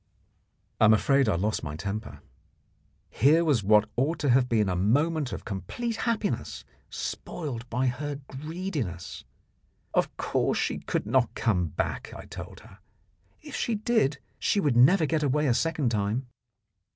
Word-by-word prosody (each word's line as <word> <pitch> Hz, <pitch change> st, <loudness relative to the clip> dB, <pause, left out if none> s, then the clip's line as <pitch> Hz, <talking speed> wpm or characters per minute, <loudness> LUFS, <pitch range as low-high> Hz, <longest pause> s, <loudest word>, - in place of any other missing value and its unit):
I -, -, +6 dB
am 110 Hz, 0 st, +7 dB
afraid 135 Hz, +2 st, +3 dB
I 100 Hz, -, +2 dB
lost 105 Hz, +5 st, 0 dB
my 75 Hz, -1 st, -5 dB
temper. 100 Hz, +6 st, -5 dB, 0.9 s
Here 155 Hz, +8 st, +4 dB
was 140 Hz, -8 st, +3 dB
what 105 Hz, +2 st, +5 dB
ought 145 Hz, +7 st, +1 dB
to 145 Hz, -4 st, +2 dB
have 125 Hz, 0 st, +3 dB
been 110 Hz, -3 st, +2 dB
a 90 Hz, -, 0 dB
moment 145 Hz, -, +1 dB
of -, -, -6 dB
complete 115 Hz, -, -4 dB
happiness 125 Hz, -, -2 dB, 0.2 s
spoiled 125 Hz, -7 st, -5 dB
by 125 Hz, +3 st, 0 dB
her 145 Hz, +4 st, -2 dB
greediness. 145 Hz, -, -5 dB, 0.7 s
Of -, -, 0 dB
course -, -, 0 dB
she -, -, -1 dB
could -, -, -2 dB
not 120 Hz, +3 st, +1 dB
come 90 Hz, -7 st, +1 dB
back, 75 Hz, -, -3 dB
I -, -, -10 dB
told -, -, -9 dB
her. -, -, -16 dB, 0.6 s
If -, -, -8 dB
she 230 Hz, -, 0 dB
did 210 Hz, -, +1 dB, 0.2 s
she 205 Hz, -, +1 dB
would 145 Hz, -10 st, +1 dB
never 155 Hz, +8 st, +6 dB
get 155 Hz, 0 st, 0 dB
away 150 Hz, +1 st, +1 dB
a 130 Hz, -, +3 dB
second 155 Hz, -1 st, 0 dB
time. 105 Hz, +4 st, -1 dB
130 Hz, 155 wpm, -27 LUFS, 105-155 Hz, 0.9 s, am